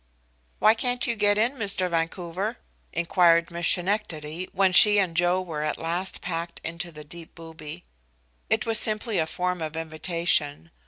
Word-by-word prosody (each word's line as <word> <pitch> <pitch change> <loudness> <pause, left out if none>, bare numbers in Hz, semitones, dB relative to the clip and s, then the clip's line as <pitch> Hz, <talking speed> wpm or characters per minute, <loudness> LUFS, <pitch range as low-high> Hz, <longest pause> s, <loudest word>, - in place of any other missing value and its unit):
"Why 215 - +5
can't 245 +2 0
you 235 - -1
get 205 -1 +2
in, 240 +6 0
Mr. 200 -4 0
Vancouver?" 175 +5 -3 0.3
inquired 170 0 +3
Miss 170 0 0
Schenectady, 180 -3 -1
when 195 -1 +2
she 210 +3 +8
and 185 -5 +1
Joe 175 +2 +2
were 160 -4 -5
at 150 0 -2
last 175 +3 -3
packed 170 +1 -5
into 170 +1 -5
the 150 -1 -11
deep 165 +2 -12
booby. 160 0 -9 0.7
It - - +1
was 225 -1 +3
simply 215 0 0
a 160 - 0
form 180 +1 -3
of 160 0 -5
invitation. 160 - -1
175 Hz, 160 wpm, -25 LUFS, 165-200 Hz, 0.7 s, she